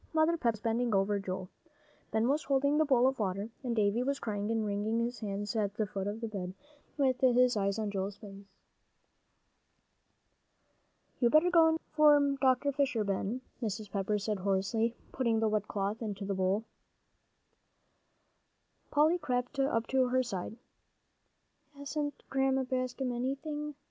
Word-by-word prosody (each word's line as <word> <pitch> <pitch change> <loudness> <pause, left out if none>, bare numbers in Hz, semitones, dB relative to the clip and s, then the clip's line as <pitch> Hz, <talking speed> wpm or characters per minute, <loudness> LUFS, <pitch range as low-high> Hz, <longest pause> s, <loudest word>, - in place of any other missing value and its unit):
Mother 315 +1 +3
Pepper 240 -8 +1
was 215 - -15
bending 230 0 0
over 200 +1 +2
Joel. 185 -1 -4 0.6
Ben 220 +1 +1
was 285 +3 +1
holding 280 +2 +2
the 315 - +4
bowl 255 -4 +4
of 265 -1 +1
water, 200 +2 -2
and 245 -3 -2
Davie 210 +2 +2
was 275 +2 0
crying 205 -1 -3
and 225 -1 0
wringing 210 +2 -1
his 240 +1 -2
hands 205 +1 -4
at 205 -2 0
the 215 - 0
foot 195 -1 -4
of 210 +2 -4
the 230 - -2
bed, 190 -4 -5 0.4
with 260 -3 +1
his 250 -1 +4
eyes 200 0 0
on 215 -2 -2
Joel's 195 0 -3
face. 200 -1 -12 2.7
"You 240 - +4
better 310 +6 +4
go 320 -2 +5
for 295 -2 +5
Dr. 265 +1 +3
Fisher, 275 -5 0
Ben," 200 +4 -2 0.2
Mrs. 215 -2 -4
Pepper 200 +1 0
said 210 0 -2
hoarsely, 200 +5 0 0.2
putting 235 -4 +1
the 220 - +2
wet 210 -1 0
cloth 205 +2 -2
into 205 -3 -4
the 200 - -1
bowl. 190 +3 +1 2.3
Polly 310 +4 +3
crept 250 -1 -2
up 235 -4 +1
to 260 -1 +3
her 255 +1 +2
side. 215 -1 -5 1.2
"Hasn't 290 +1 -4
Grandma 265 0 +1
Bascom 255 0 -2
anything?" 290 +4 -3
230 Hz, 155 wpm, -31 LUFS, 205-270 Hz, 2.7 s, go